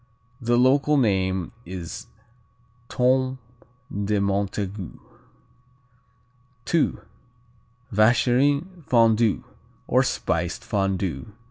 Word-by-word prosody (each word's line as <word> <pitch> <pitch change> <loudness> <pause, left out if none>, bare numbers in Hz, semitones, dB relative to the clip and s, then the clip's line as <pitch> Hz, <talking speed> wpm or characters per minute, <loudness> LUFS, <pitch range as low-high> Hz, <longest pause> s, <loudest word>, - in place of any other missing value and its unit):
The 120 0 +2
local 140 +4 +4
name 95 - +1
is 90 -5 -7 0.8
Tome 130 +1 +1 0.6
de 100 +1 0
Montague. 100 -1 -2 1.8
II. 165 - +3 1.0
Vacherin 135 - +2
Fondu, 115 -3 +3 0.4
or - - +4
Spiced - - -2
Fondu. 95 -5 -2
110 Hz, 70 wpm, -24 LUFS, 95-130 Hz, 1.8 s, local